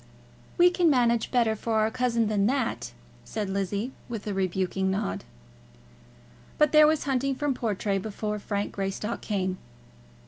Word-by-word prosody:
"We 355 Hz, 0 st, +6 dB
can 355 Hz, -2 st, +3 dB
manage 235 Hz, -4 st, +2 dB
better 235 Hz, -3 st, +2 dB
for 225 Hz, +1 st, -3 dB
our 215 Hz, +1 st, +2 dB
cousin 235 Hz, -2 st, +1 dB
than 205 Hz, -1 st, +2 dB
that," 255 Hz, -, -1 dB, 0.3 s
said 205 Hz, -3 st, -4 dB
Lizzie, 200 Hz, +5 st, -2 dB, 0.2 s
with 225 Hz, -4 st, -5 dB
a 210 Hz, -, -2 dB
rebuking 190 Hz, 0 st, 0 dB
nod. 95 Hz, -, -2 dB, 1.3 s
But 300 Hz, -2 st, +4 dB
there 305 Hz, -1 st, +7 dB
was 310 Hz, 0 st, +2 dB
hunting 270 Hz, 0 st, 0 dB
from 290 Hz, 0 st, 0 dB
Portray 205 Hz, -4 st, -1 dB
before 210 Hz, +1 st, -4 dB
Frank 205 Hz, 0 st, -3 dB
Greystock 195 Hz, +3 st, -3 dB
came. 190 Hz, -3 st, -2 dB
220 Hz, 145 wpm, -27 LUFS, 195-255 Hz, 1.3 s, there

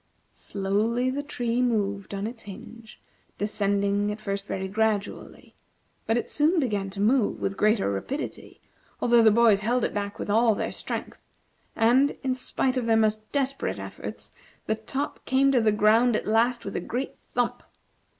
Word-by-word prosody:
Slowly 215 Hz, +6 st, -1 dB
the 280 Hz, +2 st, -2 dB
tree 245 Hz, -4 st, -2 dB
moved 205 Hz, -5 st, -1 dB
on 200 Hz, +1 st, -3 dB
its 225 Hz, +1 st, -6 dB
hinge, 220 Hz, +3 st, -11 dB, 0.4 s
descending 205 Hz, 0 st, 0 dB
at 210 Hz, -, -6 dB
first 200 Hz, -2 st, -4 dB
very 190 Hz, 0 st, -3 dB
gradually; 215 Hz, 0 st, -2 dB, 0.5 s
but 225 Hz, -, +2 dB
it 240 Hz, -, -2 dB
soon 315 Hz, +4 st, +2 dB
began 205 Hz, -8 st, -1 dB
to 195 Hz, +1 st, -8 dB
move 225 Hz, +2 st, +2 dB
with 195 Hz, -, -2 dB
greater 215 Hz, +1 st, +2 dB
rapidity, 260 Hz, -, -5 dB, 0.4 s
although 240 Hz, -1 st, +4 dB
the 225 Hz, -, +7 dB
boys 215 Hz, -2 st, +4 dB
held 240 Hz, +3 st, +1 dB
it -, -, -1 dB
back 200 Hz, 0 st, -3 dB
with -, -, -5 dB
all 220 Hz, +1 st, +3 dB
their -, -, -3 dB
strength; -, -, -5 dB, 0.6 s
and, 250 Hz, +5 st, +3 dB
in 260 Hz, -1 st, +1 dB
spite 255 Hz, 0 st, -1 dB
of 240 Hz, -2 st, -1 dB
their 225 Hz, -1 st, +4 dB
most 215 Hz, 0 st, 0 dB
desperate 275 Hz, -1 st, -1 dB
efforts, -, -, -8 dB, 0.3 s
the -, -, +1 dB
top 240 Hz, +6 st, -4 dB
came 270 Hz, +1 st, +3 dB
to 250 Hz, -3 st, +3 dB
the 220 Hz, -1 st, +3 dB
ground 220 Hz, +3 st, +4 dB
at -, -, -2 dB
last 235 Hz, +3 st, +1 dB
with 195 Hz, -, -5 dB
a -, -, -1 dB
great 250 Hz, +9 st, -3 dB, 0.2 s
thump. 245 Hz, -1 st, -1 dB
220 Hz, 170 wpm, -26 LUFS, 205-245 Hz, 0.6 s, the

